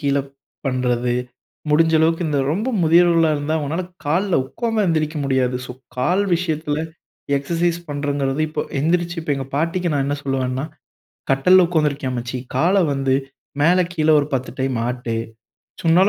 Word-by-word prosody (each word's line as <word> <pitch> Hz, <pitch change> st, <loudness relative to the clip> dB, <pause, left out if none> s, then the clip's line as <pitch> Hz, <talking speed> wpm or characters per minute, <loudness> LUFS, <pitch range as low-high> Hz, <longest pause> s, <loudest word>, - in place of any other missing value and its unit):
கீழ 140 Hz, -2 st, +1 dB, 0.5 s
பண்றது, 125 Hz, -2 st, 0 dB, 0.6 s
முடிஞ்ச 160 Hz, +2 st, +4 dB
அளவுக்கு 165 Hz, +2 st, +2 dB
இந்த 145 Hz, -2 st, 0 dB
ரொம்ப 210 Hz, +9 st, -1 dB
முதியவர்களா 165 Hz, 0 st, +5 dB
இருந்தா, 145 Hz, +2 st, -2 dB
அவுங்கனால 155 Hz, +4 st, -2 dB, 0.2 s
கால்ல 175 Hz, +6 st, +1 dB
உட்கார்ந்தா 225 Hz, -, -1 dB
ஏந்திரிக்க 155 Hz, -1 st, 0 dB
முடியாது. 130 Hz, -2 st, +1 dB
சோ -, -, -6 dB, 0.2 s
கால் 180 Hz, +10 st, +2 dB
விஷயத்தில 160 Hz, -2 st, -1 dB, 0.5 s
எக்சர்சைஸ் 170 Hz, +4 st, 0 dB
பண்றதுங்கிறது, 145 Hz, -1 st, -1 dB
இப்போ 155 Hz, -1 st, -2 dB, 0.2 s
எந்திரிச்சு 175 Hz, +3 st, 0 dB
இப்போ 155 Hz, -2 st, -1 dB
எங்க 135 Hz, -1 st, -4 dB
பாட்டிக்கு 170 Hz, +4 st, 0 dB
நான் 140 Hz, -1 st, +1 dB
என்ன 145 Hz, +1 st, -1 dB
சொல்வேன்னா, 130 Hz, 0 st, -1 dB, 0.7 s
"கட்டில்ல 180 Hz, +7 st, +5 dB
உக்காந்திருக்கியே 150 Hz, -5 st, 0 dB
அம்மச்சி, 125 Hz, +1 st, -4 dB, 0.2 s
காலை 185 Hz, +7 st, +3 dB
வந்து 135 Hz, -1 st, +1 dB, 0.5 s
மேல 175 Hz, +4 st, +5 dB
கீழே 155 Hz, -2 st, +3 dB
ஒரு 140 Hz, -, -2 dB
பத்து 130 Hz, -1 st, -2 dB
டைம் 130 Hz, -1 st, 0 dB
ஆட்டு. 125 Hz, -2 st, -3 dB, 0.7 s
உன்னால 175 Hz, +4 st, +5 dB
150 Hz, 140 wpm, -21 LUFS, 135-170 Hz, 0.7 s, முதியவர்களா